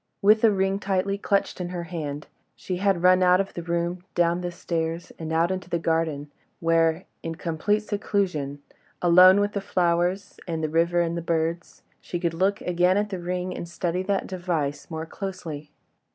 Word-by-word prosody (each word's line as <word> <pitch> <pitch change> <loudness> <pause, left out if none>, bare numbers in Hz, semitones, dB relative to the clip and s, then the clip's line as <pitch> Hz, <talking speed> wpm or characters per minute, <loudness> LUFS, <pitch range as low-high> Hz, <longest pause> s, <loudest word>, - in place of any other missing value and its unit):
With 215 +2 +6
the 225 - +6
ring 195 0 +1
tightly 195 0 -1
clutched 200 -2 0
in 175 - -3
her 175 -1 -4
hand, 150 -4 -5 0.3
she 185 - -4
had 190 -2 +1
run 185 0 +6
out 180 0 +5
of 195 - -2
the 175 - -5
room, 170 +1 -2
down 175 0 +2
the 175 -1 -3
stairs, 170 -1 -3
and 160 -1 -5
out 165 +2 +2
into 185 -2 -4
the 170 - 0
garden, 160 -3 -1 0.3
where, 165 +1 +2 0.2
in 165 0 -4
complete 170 +7 0
seclusion, 180 -10 -2 0.4
alone 180 +2 +7
with 205 0 +1
the 200 - -3
flowers, 180 +1 0
and 165 -2 -2
the 155 - 0
river 170 +2 +2
and 170 0 -1
the 170 - -2
birds, 165 +1 -2 0.2
she 175 - -4
could 170 -2 -1
look 190 +4 +1
again 180 +1 +2
at 210 0 0
the 190 - -3
ring, 180 +1 -3
and 170 - -6
study 175 +1 -2
that 195 +1 -1
device 165 -6 -3
more 160 -1 -4
closely. 165 -5 -6
175 Hz, 185 wpm, -25 LUFS, 165-185 Hz, 0.4 s, alone